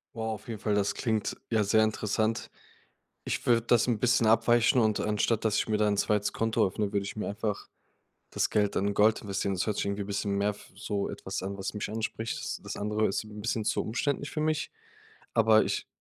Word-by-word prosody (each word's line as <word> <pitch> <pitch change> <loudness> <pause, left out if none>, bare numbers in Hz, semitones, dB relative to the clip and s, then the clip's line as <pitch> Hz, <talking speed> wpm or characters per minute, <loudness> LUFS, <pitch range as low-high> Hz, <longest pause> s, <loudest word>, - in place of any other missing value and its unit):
Wow, 110 -1 -2
auf 105 - -10
jeden 110 -2 -5
Fall, 105 0 0
das 100 -1 +1
klingt 110 -4 -1
ja 110 -2 +2
sehr 110 +2 +4
interessant. 110 +1 -1 0.8
Ich - - -3
würde 115 -1 +4
das 120 +1 +3
'n 120 -3 +1
bisschen 120 -1 +3
abweichen 115 +3 +4
und 110 -2 +2
anstatt, 105 +1 0
dass 110 -2 +2
ich - - +1
mir 110 - +2
da 105 0 +2
'n 100 - +1
2. 105 0 +1
Konto 115 0 +1
öffne, 100 +1 -1
würde 100 -1 0
ich 100 - -6
mir 105 - -3
einfach 105 0 -3 0.6
das - - 0
Geld 105 -1 +1
in 100 +1 +1
Gold 105 +2 +3
investieren. 100 -1 -2
Das 90 - 0
hört 105 - 0
sich - - -1
irgendwie 100 0 -2
bisschen 100 0 -2
mehr 100 +1 +1
f 105 - -11
so 100 0 -3
etwas 95 - -5
an, 100 +1 -4
was 95 - -4
mich 105 - -4
anspricht. 110 +1 -3
S - - -4
das - - -5
andere 105 +1 0
ist 95 - -1
'n 105 0 -9
bisschen 110 0 -1
zu - - +1
umständlich 140 +5 -2
für 155 - -2
mich, 155 -1 -1 0.6
aber 110 -1 +5
ich - - -2
105 Hz, 220 wpm, -29 LUFS, 100-115 Hz, 0.8 s, aber